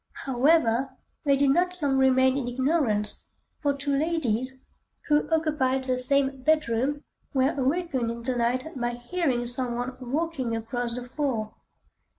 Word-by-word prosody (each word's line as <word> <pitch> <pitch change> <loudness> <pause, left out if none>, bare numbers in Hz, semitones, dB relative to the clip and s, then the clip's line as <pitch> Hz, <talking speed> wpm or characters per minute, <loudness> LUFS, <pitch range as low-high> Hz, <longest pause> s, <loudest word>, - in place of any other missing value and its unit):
However, 265 -1 +2 0.3
they 280 -1 +4
did 275 0 +3
not 360 +4 +1
long 275 -3 +1
remain 260 0 +4
in 270 -3 -2
ignorance, 245 -5 +1 0.3
for 285 -2 0
two 280 0 -1
ladies, 265 -5 -1 0.5
who 295 0 +2
occupied 300 -5 +1
the 255 -1 0
same 270 +1 +1
bedroom, 285 -1 +1 0.3
were 265 +3 +3
awakened 275 -2 0
in 235 0 -5
the 255 +1 0
night 245 +2 0
by 240 -1 -2
hearing 245 0 -1
some 245 0 0
one 245 +2 -3
walking 265 -2 -2
across 235 +1 -2
the 250 0 -6
floor. 245 -6 -2
260 Hz, 145 wpm, -26 LUFS, 245-290 Hz, 0.5 s, they